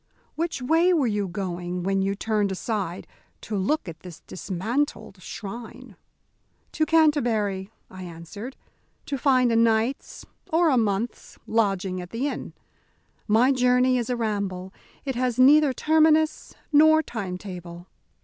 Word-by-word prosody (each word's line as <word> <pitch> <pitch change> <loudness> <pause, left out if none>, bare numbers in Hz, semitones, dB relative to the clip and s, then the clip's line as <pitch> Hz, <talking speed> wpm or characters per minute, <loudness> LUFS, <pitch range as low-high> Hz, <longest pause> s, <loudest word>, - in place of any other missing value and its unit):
Which 325 -5 -3
way 330 +7 +3
were 305 -6 +2
you 205 -3 0
going 180 -1 -4
when 195 +1 +1
you 195 +1 0
turned 210 -1 0
aside 190 -2 -3 0.4
to 215 - -5
look 205 +6 0
at 160 -2 -8
this 175 -1 -11
dismantled 195 +3 -3
shrine?" 230 +4 -8 0.8
"To 310 - 0
Canterbury," 235 -12 +2 0.2
I 185 - -11
answered, 180 +8 -8 0.5
"to 285 - -3
find 255 -3 +3
a - - +2
night's, 230 +3 +1 0.3
or 325 0 +4
a - - +3
month's, 220 +1 -2
lodging 195 -4 0
at 180 - -9
the 240 +7 -2
inn. - - -5 0.7
My 230 +5 +4
journey 250 0 +3
is 235 - -3
a 250 - 0
ramble, 200 -4 -3 0.3
it 270 - -1
has 250 -1 -1
neither 285 +3 +6
terminus 315 +2 +2 0.2
nor 315 +1 +6
time 195 -9 -5
table." 175 -3 -9
225 Hz, 140 wpm, -25 LUFS, 190-265 Hz, 0.8 s, neither